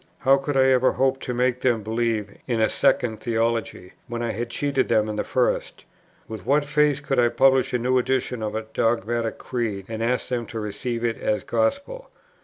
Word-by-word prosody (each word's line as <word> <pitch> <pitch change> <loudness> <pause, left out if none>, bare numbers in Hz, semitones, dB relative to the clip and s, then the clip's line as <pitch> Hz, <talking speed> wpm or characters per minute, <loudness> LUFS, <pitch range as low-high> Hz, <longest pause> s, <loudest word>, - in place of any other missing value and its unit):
How 135 +1 +5
could 135 0 -2
I 130 - +5
ever 130 0 +3
hope 135 +1 +1
to - - -4
make 125 0 0
them 120 -5 +1
believe 110 -2 -2
in 120 -3 0
a 110 - +3
second 125 -5 +1
theology, 115 -5 -2
when 120 -1 -4
I 115 - -1
had 120 +1 -4
cheated 135 +1 0
them 110 -2 +3
in 105 - -3
the 105 - -1
first? 125 -1 -1 0.4
With 110 -4 -7
what 140 +6 +2
face 145 -1 +2
could 140 -3 -1
I 120 -1 +4
publish 130 +2 +3
a 125 - +1
new 125 +2 +2
edition 125 -1 -1
of 105 0 -3
a 110 - -2
dogmatic 115 +1 -1
creed, 110 -6 -3
and 115 0 -5
ask 125 +2 0
them 120 -3 -2
to 115 - -5
receive 110 +3 -4
it 115 -1 -1
as 105 - -1
gospel? 280 - -2
120 Hz, 205 wpm, -24 LUFS, 110-130 Hz, 0.4 s, How